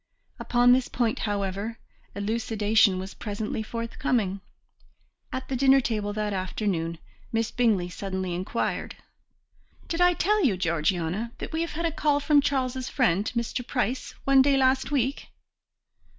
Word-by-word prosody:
Upon 245 0 +4
this 255 0 +2
point, 235 -2 -1
however, 200 +2 -2 0.4
elucidation 215 -1 +2
was 190 +1 -6
presently 210 +1 -4
forthcoming. 230 -3 -2 0.9
At 260 - -4
the 265 - -2
dinner 270 +1 +5
table 215 -5 -1
that 210 -1 -2
afternoon 185 -3 -2 0.3
Miss 225 0 0
Bingley 220 -8 +2
suddenly 190 0 -4
inquired: 185 +6 -2 0.9
"Did 335 +1 -2
I 355 0 +5
tell 420 +3 +2
you, 220 - +2
Georgiana, 175 +5 -1
that - - -6
we 320 - -1
had 335 0 -3
a 330 - +1
call 295 -2 +1
from 290 0 +4
Charles's 260 -2 -1
friend, 210 - +1
Mr. 235 +1 -1
Price, 250 0 -2
one 275 -1 +5
day 275 0 +4
last 260 0 +2
week?" 275 -1 -1
230 Hz, 135 wpm, -26 LUFS, 200-265 Hz, 0.9 s, dinner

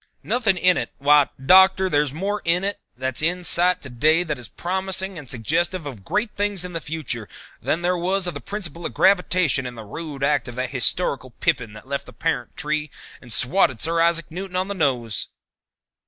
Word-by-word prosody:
Nothing 220 -7 +1
in 180 0 +4
it? - - -2
Why, 145 0 +5
Doctor, 190 +6 +6
there's 145 -5 +1
more 200 +7 -2
in 170 +2 +2
it 200 +1 -1 0.2
that's 130 +1 -2
in 175 +3 0
sight 180 +1 +3
to 135 - -7
day 155 +8 +3
that 150 -6 -4
is 120 - -7
promising 190 +1 -1
and 150 -6 -9
suggestive 165 - -1
of 125 -9 -8
great 210 - -1
things 205 -3 -1
in 180 - -7
the 165 - -3
future 140 -9 -5 0.3
than 170 +2 -1
there 180 +1 +2
was 185 +2 0
of 175 - -1
the 145 - -7
principle 175 -5 -5
of - - -5
gravitation 180 -8 +3
in 125 - -8
the 110 -2 -9
rude 145 +4 -7
act 140 -3 +1
of 120 - -8
that 130 0 -3
historic 140 +4 0 0.2
pippin 115 -5 0
that 110 +4 -13
left 140 0 -3
the - - -12
parent 155 -7 -3
tree 150 0 -2 0.3
and 125 - -9
swatted 130 - +3
Sir 165 +4 +2
Isaac 165 -1 +1
Newton 185 +2 -6
on 185 +2 -1
the - - -1
nose." 125 - 0
165 Hz, 200 wpm, -23 LUFS, 135-185 Hz, 0.3 s, Doctor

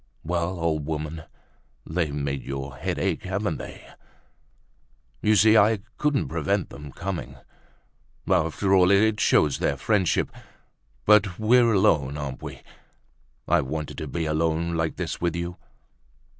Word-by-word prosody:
"Well, 85 +2 -2
old 80 -3 -1
woman, 80 0 -4 0.6
they've 80 -2 -1
made 70 -1 -3
your 70 -1 -6
head - - -3
ache, - - -1
haven't - - -2
they? - - -10 1.3
You 110 0 +3
see 110 +1 +6
I 110 -1 +4 0.2
couldn't 150 -2 +1
prevent 85 +4 -1
them 75 0 -9
coming. 85 -8 -5 0.9
After 95 +2 +1
all, 90 -1 +5
it 105 +2 +3
shows 75 -3 +3
their 70 - 0
friendship. 95 +3 +1 0.7
But 100 -3 +4
we're 115 +3 +4
better 115 - +3
alone, 75 -9 +2
aren't 70 -3 -5
we? - - -8 0.8
I 85 0 +3
wanted 75 +2 -5
to - - -5
be 85 -2 -3
alone 80 +2 0
like 80 -1 -1
this - - -4
with 85 -1 0
you. 85 +1 -4
85 Hz, 140 wpm, -25 LUFS, 75-100 Hz, 1.3 s, see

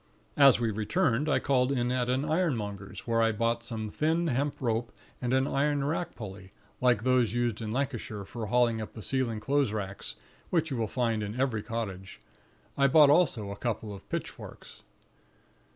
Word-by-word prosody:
As 140 -4 +7
we 115 -2 0
returned, 125 - +1
I - - +3
called 130 -1 +2
in 125 -2 0
at 125 -1 0
an 130 +3 +1
ironmonger's, 115 - -2
where 115 -1 +1
I 115 0 +3
bought 115 +2 0
some 110 -2 -5
thin 160 +3 +1
hemp 140 -1 0
rope 120 -1 -1 0.3
and 125 -1 -1
an 130 +1 +3
iron 145 0 +1
rack 165 +4 -2
pulley, 95 -3 -9 0.3
like 125 -4 +3
those 125 -4 +2
used 120 -2 0
in 110 -1 -4
Lancashire 120 -6 -3
for 110 +1 -6
hauling 115 0 +2
up 110 - -7
the 110 - -9
ceiling 125 -3 -1
clothes 135 +1 +1
racks, 100 -2 -4 0.3
which 160 -3 +1
you 130 - -1
will 115 -1 0
find 115 -1 0
in 105 +4 -4
every 125 -5 +1
cottage. 100 -4 -5 0.6
I 140 0 +4
bought 145 +1 +7
also 130 - +2
a - - -5
couple 110 -3 -3
of 100 - -12
pitchforks. - - -7
120 Hz, 180 wpm, -29 LUFS, 110-140 Hz, 0.6 s, As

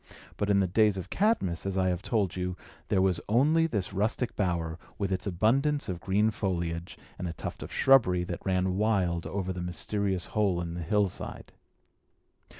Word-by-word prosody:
But 105 - -1
in 100 -1 +4
the - - +3
days 105 +2 +3
of 95 +1 -6
Cadmus, 190 - +1
as 95 -1 -2
I 95 -1 +2
have 90 -1 -1
told 105 -5 0
you, 90 -1 -3 0.3
there 95 - +2
was 95 -3 +1
only 155 +9 +4
this 100 - -2
rustic 110 +5 0
bower, 85 -4 -1 0.2
with 100 -2 -2
its 95 0 -2
abundance 135 - +1
of 90 -2 -4
green 105 +3 +2
foliage, 85 -4 -3 0.2
and 90 - -3
a 85 - -4
tuft - - -6
of - - -7
shrubbery, 110 -10 +4
that 90 -1 -5
ran 95 -1 0
wild 95 -6 +1
over 95 -1 -3
the 90 - -5
mysterious 95 +1 -1
hole 100 -5 +1
in 85 -1 -4
the 85 - -5
hillside. 100 +3 -1
95 Hz, 180 wpm, -29 LUFS, 90-105 Hz, 0.3 s, in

